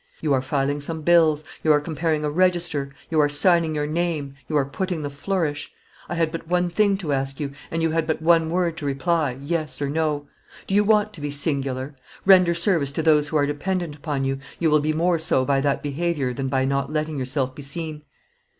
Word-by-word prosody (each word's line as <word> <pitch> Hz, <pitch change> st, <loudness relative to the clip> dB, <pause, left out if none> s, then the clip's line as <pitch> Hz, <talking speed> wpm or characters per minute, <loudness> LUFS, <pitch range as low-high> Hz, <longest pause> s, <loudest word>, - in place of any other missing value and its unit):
You 150 Hz, -3 st, 0 dB
are 130 Hz, -, +2 dB
filing 140 Hz, +2 st, -1 dB
some 160 Hz, +2 st, -3 dB
bills, 160 Hz, -2 st, +4 dB, 0.2 s
you 155 Hz, -, +4 dB
are 150 Hz, -, +5 dB
comparing 155 Hz, 0 st, -1 dB
a -, -, 0 dB
register; 170 Hz, -5 st, +1 dB, 0.2 s
you 160 Hz, -, +2 dB
are 145 Hz, -1 st, +4 dB
signing 160 Hz, +1 st, +3 dB
your 150 Hz, 0 st, 0 dB
name, 155 Hz, -3 st, -2 dB, 0.2 s
you 155 Hz, -, +1 dB
are 140 Hz, -, +2 dB
putting 175 Hz, +3 st, -3 dB
the 145 Hz, -, -4 dB
flourish. 150 Hz, 0 st, -2 dB, 0.4 s
I 175 Hz, -, -2 dB
had 165 Hz, -2 st, +1 dB
but 165 Hz, -1 st, -6 dB
one 180 Hz, 0 st, +1 dB
thing 200 Hz, +1 st, +2 dB
to 160 Hz, -7 st, -2 dB
ask 135 Hz, 0 st, -1 dB
you, 145 Hz, -2 st, -3 dB, 0.2 s
and 165 Hz, 0 st, -2 dB
you 165 Hz, -, +2 dB
had 160 Hz, 0 st, 0 dB
but 160 Hz, -, 0 dB
one 165 Hz, 0 st, +3 dB
word 170 Hz, -1 st, 0 dB
to 155 Hz, -, -5 dB
reply: 140 Hz, -1 st, 0 dB
yes 155 Hz, +2 st, -3 dB
or 140 Hz, -1 st, -2 dB
no. 150 Hz, -2 st, -1 dB, 0.4 s
Do -, -, -4 dB
you 205 Hz, +1 st, +5 dB
want 210 Hz, 0 st, +2 dB
to 155 Hz, -, -10 dB
be 145 Hz, -, -3 dB
singular? 140 Hz, -2 st, -2 dB, 0.3 s
Render 185 Hz, -3 st, +6 dB
service 170 Hz, -5 st, +2 dB
to 160 Hz, -, -2 dB
those 150 Hz, -2 st, +4 dB
who 155 Hz, -, 0 dB
are 145 Hz, -, +3 dB
dependent 165 Hz, +2 st, -2 dB
upon 145 Hz, -2 st, -3 dB
you, 135 Hz, 0 st, -1 dB, 0.2 s
you 165 Hz, -2 st, +1 dB
will 150 Hz, -, +5 dB
be 155 Hz, +1 st, 0 dB
more 165 Hz, +2 st, +1 dB
so 130 Hz, -4 st, +2 dB
by 140 Hz, 0 st, +2 dB
that 140 Hz, 0 st, 0 dB
behavior 145 Hz, -3 st, -1 dB
than 135 Hz, +2 st, -3 dB
by 130 Hz, 0 st, +1 dB
not 140 Hz, +1 st, -1 dB
letting 155 Hz, -1 st, -2 dB
yourself 130 Hz, 0 st, -1 dB
be 145 Hz, -, -10 dB
seen. 150 Hz, +2 st, -5 dB
155 Hz, 225 wpm, -23 LUFS, 140-170 Hz, 0.4 s, Render